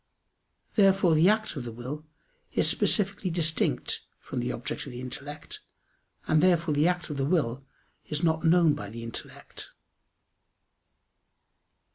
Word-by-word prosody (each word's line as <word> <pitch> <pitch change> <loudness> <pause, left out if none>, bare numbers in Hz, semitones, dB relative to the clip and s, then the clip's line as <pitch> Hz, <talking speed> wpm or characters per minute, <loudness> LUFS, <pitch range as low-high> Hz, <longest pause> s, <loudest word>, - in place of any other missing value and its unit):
Therefore 195 -4 +4
the 160 +4 +5
act 215 -2 +1
of 135 - -4
the 120 - -6
will 130 +7 -7 0.5
is - - +2
specifically 200 -2 +1
distinct 165 -1 +1 0.2
from - - -5
the - - -1
object - - -4
of - - -7
the 125 - -7
intellect, 140 +4 -6 0.7
and 155 -1 +4
therefore 170 -3 +3
the 150 +3 +3
act 175 -3 -1
of 145 - -4
the 135 - 0
will 140 -5 0 0.4
is 150 +2 -3
not 160 -1 +2
known 165 -2 +5
by 100 -6 -6
the 115 +2 -8
intellect. 115 -1 -9
155 Hz, 140 wpm, -28 LUFS, 140-180 Hz, 0.7 s, the